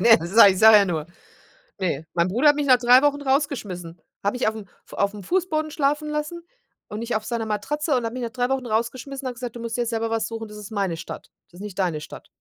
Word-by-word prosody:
Ne, 225 +3 +7
sage 200 +1 +7
ich - - -5
sage 220 +1 +8
ja 200 - +4
nur, 160 -5 -3 0.7
ne, 160 -4 -2
mein 170 +1 +2
Bruder 245 +10 +3
hat 290 - +5
mich 290 -1 -1
nach 255 -2 +6
3 250 +2 +6
Wochen 290 0 +2
rausgeschmissen, 220 - -2 0.2
habe 200 +5 0
ich 250 - +1
aufm 220 -1 -4 0.2
F - - -20
aufm 200 0 -1
Fußboden 315 - -1
schlafen 295 +1 0
lassen 300 +3 -4 0.5
und 210 - -6
nicht 235 +1 -3
auf 215 - -3
seiner 230 -2 -3
Matratze 285 +8 -1
und 245 - -1
hat 225 - -3
mich 255 0 -5
nach 235 - -3
3 245 0 -1
Wochen 265 -2 -1
rausgeschmissen 250 +5 -3
und - - -1
hat 245 - -8
gesagt: 240 -1 -6
„Du - - -7
musst 230 0 -4
dir 245 - 0
jetzt 235 - -2
selber 225 -1 -2
was 225 -1 -1
suchen, 225 -1 -6
das 210 - -11
ist 210 +1 -9
meine 195 -5 -1
Stadt, 165 - -9 0.2
das 175 - -16
ist - - -7
nicht 205 -2 -8
deine 175 -5 0
Stadt.“ 155 - -11
230 Hz, 260 wpm, -23 LUFS, 205-270 Hz, 0.7 s, sage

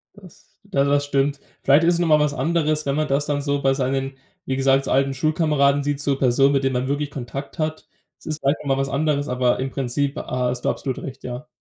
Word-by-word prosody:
Das 190 -5 -18
da 195 -9 0
das 145 0 +2
stimmt. 140 0 0 0.2
Vielleicht 140 +4 +5
ist 170 +1 +4
es - - -1
noch 175 - +1
mal 155 -1 +5
was 150 -1 +1
anderes, 155 +2 0
wenn 140 0 0
man 155 0 0
das 140 +1 +1
dann 145 -1 -1
so 140 0 -1
bei 135 -1 +3
seinen, 135 0 -2 0.3
wie 130 - -1
gesagt, 135 0 +2
so - - -3
alten 135 +1 +2
Schulkameraden 145 -1 +2
sieht 145 -1 -1
so 140 -1 0
Personen, 135 +2 +3
mit 135 -1 +1
denen 135 0 +1
man 125 +1 -1
wirklich 145 +1 -2
Kontakt 135 +3 -7
hat. 155 0 -3 0.3
Es - - -21
ist 155 -1 -4
vielleicht 140 +1 +1
noch 150 - -8
mal 135 - 0
was 135 - -2
anderes, 145 +1 0
aber 125 -2 +1
im 130 +1 -2
Prinzip, 140 +2 -2
ha 125 -1 -2
hast 125 0 -4
du - - +3
absolut 130 -3 -3
recht, 135 -1 -8
ja. 125 +4 -6
140 Hz, 250 wpm, -22 LUFS, 135-150 Hz, 0.3 s, Vielleicht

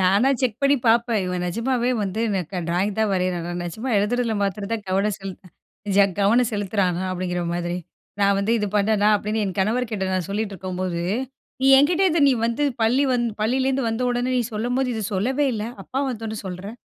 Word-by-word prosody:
நானா 195 +7 +4
செக் 245 -5 0
பண்ணி 275 +1 +5
பாப்பேன். 230 -2 +3
இவன் 180 -1 -2
நிஜமாவே 240 +6 0
வந்து 200 +2 -2
எனக்கு 190 -2 -2
ட்ராயிங் 185 +4 0
தான் 220 -1 +2
வரையிறானா. 180 -2 -1
நிஜமா 215 +9 -5
எழுதுறதுல 230 +3 0
மாத்திரம் 200 +1 -2
தான் 220 -2 -3
கவனம் 195 +2 +1
செலுத் 195 -2 -8 0.6
ச 200 - +7 0.2
கவனம் 225 +4 +4
செலுத்துறானா? 195 -3 0
அப்டிங்கற 180 -1 -2
மாதிரி. 175 0 -2 0.4
"நான் 200 0 +4
வந்து 200 +3 +1
இது 210 - -1
பண்ணேனா?", 210 0 +3
அப்படின்னு 215 +1 -2
என் 195 0 -4
கணவர்கிட்ட 215 -1 0
நான் 185 -1 -1
சொல்லிட்ருக்கும்போது," 185 -4 -3 0.6
நீ - - +4
என்கிட்ட 330 +7 +3
இது 325 0 +1
நீ - - +5
வந்து 235 +5 0 0.2
பள்ளி 250 +5 +3
வந் 245 -1 +1 0.2
பள்ளியிலேருந்து 260 +2 +1
வந்த 225 +2 -2
உடனே 245 +1 -1
நீ 245 - +2
சொல்லும்போது 245 +4 -1
இத 220 - -3
சொல்லவே 260 +9 +1
இல்ல, 215 -1 -3 0.2
அப்பா 265 - -3
வந்த 225 -3 -6
உடனே 220 0 -4
சொல்ற?" 185 +2 -6
210 Hz, 180 wpm, -23 LUFS, 190-240 Hz, 0.6 s, ச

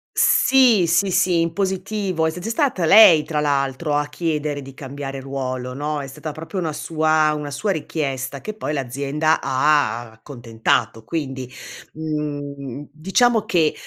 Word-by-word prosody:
Sì, 250 -8 +4
sì 170 +4 +2
sì 180 -2 +2
in 165 0 -1
positivo, 190 -3 -1
s 160 - -7
s 180 - -9
è - - -2
stata 230 - 0
lei, 170 -4 +8
tra 155 -2 -2
l'altro, 145 +1 0
a 145 0 0
chiedere 150 -2 -2
di 135 0 -11
cambiare 135 0 -6
ruolo 130 -2 -4
no, 145 +2 -3
è - - -6
stata 145 +4 -7
proprio 165 +6 -6
una 165 -3 -2
sua 155 0 +1
una 150 -1 -4
sua 145 +9 -2
richiesta 140 -5 -3
che 215 - -6
poi 210 -8 -4
l'azienda 140 +4 0
ha 130 -4 +1
accontentato; 115 -2 -2
quindi, 135 -3 -4 0.4
mhmm 150 -2 -4
mhmm, 140 +1 -8
diciamo 210 - +2
che 170 -7 +2
150 Hz, 155 wpm, -21 LUFS, 135-170 Hz, 0.4 s, lei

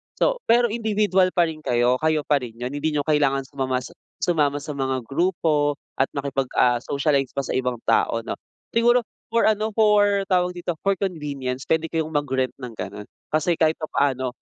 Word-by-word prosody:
so - - +1
pero 235 -1 +4
individual 210 -4 +2
pa 175 - +5
rin 160 -1 -5
kayo 125 -1 +2
kayo 155 -1 +1
pa 145 - +3
rin 120 -3 -8
yun 125 +2 -4
hindi 145 +2 -1
niyo 145 - +1
kailangan 140 -3 +2
sumama 130 -2 -1 0.5
sumama 150 -5 +2
sa 150 - -5
mga 130 -2 -2
grupo 150 -1 +1 0.2
at 135 - +3
makipag 135 -2 -1
ah 120 -1 +4
socialize 140 -1 0
pa 140 - -1
sa - - -4
ibang 125 -1 -1
tao 115 0 +2
'no - - -3 0.4
siguro 240 +1 +4 0.3
for 230 +1 +2
ano 215 0 +2
for 205 -2 +4
tawag 180 -1 +2
dito 175 0 -2
for 195 0 +2
convenience 140 -8 -4
pwede 160 0 +2
kayong 160 -1 -1
mag 145 -1 0
rent 130 -1 0
ng 125 -3 -7
ganon 105 -1 -6 0.2
kasi 155 +3 +1
kahit 160 -1 +3
pa-paano 130 -5 -1
150 Hz, 180 wpm, -23 LUFS, 135-185 Hz, 0.5 s, pa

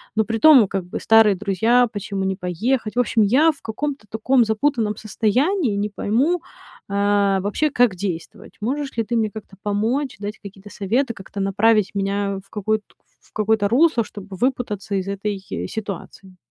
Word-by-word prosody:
Но 220 - +3
притом 230 +2 +6
как 190 -2 -3
бы 180 - -6
старые 225 -3 +5
друзья, 220 +5 +2
почему 200 -1 -4
не 190 0 -1
поехать? 215 +6 -1
В - - +1
общем, 230 -2 +2
я 280 +10 +4
в 285 - -18
каком-то 270 0 -4
таком 235 +2 +2
запутанном 220 -1 0
состоянии 235 - 0
не 205 +1 -1
пойму, 270 - 0 0.5
а, 200 -1 +2
вообще, 210 +10 0
как 245 -8 +2
действовать. 175 -3 -6
Можешь 270 +4 -3
ли 230 - 0
ты 235 +2 -2
мне 215 -1 +1
как-то 205 -2 -11
помочь, 225 +7 -1
дать 205 +1 -6
какие-то 200 0 -12
советы, 235 +6 -1
как-то 195 0 -7
направить 205 +1 +2
меня 200 0 -1
в - - -28
какой-то 215 +1 -1 0.4
в - - -28
какое-то 215 -1 +1
русло, 245 0 +3
чтобы 195 -2 -10
выпутаться 215 -5 -2
из 190 0 -2
этой 200 +1 -3 0.3
ситуации. 195 -2 -7
215 Hz, 165 wpm, -21 LUFS, 200-240 Hz, 0.5 s, притом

